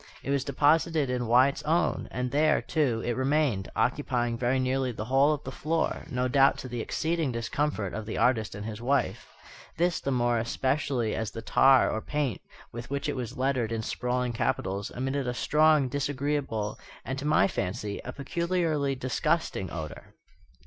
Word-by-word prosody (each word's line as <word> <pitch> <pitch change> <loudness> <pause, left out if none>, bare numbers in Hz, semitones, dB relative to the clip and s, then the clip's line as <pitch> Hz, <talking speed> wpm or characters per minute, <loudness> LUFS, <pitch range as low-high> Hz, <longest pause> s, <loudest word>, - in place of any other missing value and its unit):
It 140 - -2
was 140 -2 +1
deposited 150 0 +2
in 125 -2 -1
Wyatt's 130 +4 +4
own; 165 +3 0
and 125 0 -3
there, 155 +2 +3
too, 125 -8 0
it 120 - 0
remained, 130 -7 +1
occupying 120 0 0
very 125 +2 +1
nearly 130 0 0
the 110 -2 -5
whole 135 +4 +4
of 150 -2 -2
the - - -6
floor, 160 +2 -1
no 125 0 0
doubt 135 +1 +4
to - - -6
the 120 -2 -4
exceeding 160 +2 -1
discomfort 115 -3 -2
of 110 0 -5
the 110 - -4
artist 115 -4 +1
and 105 +1 -6
his 110 0 -6
wife; 135 +3 0 0.5
this 175 0 +1
the - - -3
more 120 -2 +2
especially 130 -1 0
as 110 -2 -2
the 115 - -8
tar 135 +2 +5
or 110 - -2
paint 145 -6 -2 0.3
with 120 +1 -7
which 140 0 -2
it - - -1
was 125 +1 -5
lettered 130 -3 0
in 115 -1 -2
sprawling 125 +1 -1
capitals 100 -5 -1
emitted 135 +1 -2
a 125 - -2
strong, 150 0 +3
disagreeable, 140 -5 -2 0.3
and, 130 +1 -3
to 140 - -5
my 150 -10 +4
fancy, 100 +2 -3
a - - -5
peculiarly 160 -2 -1
disgusting 130 - -1
odour. 80 -2 -7
130 Hz, 175 wpm, -28 LUFS, 115-145 Hz, 0.5 s, tar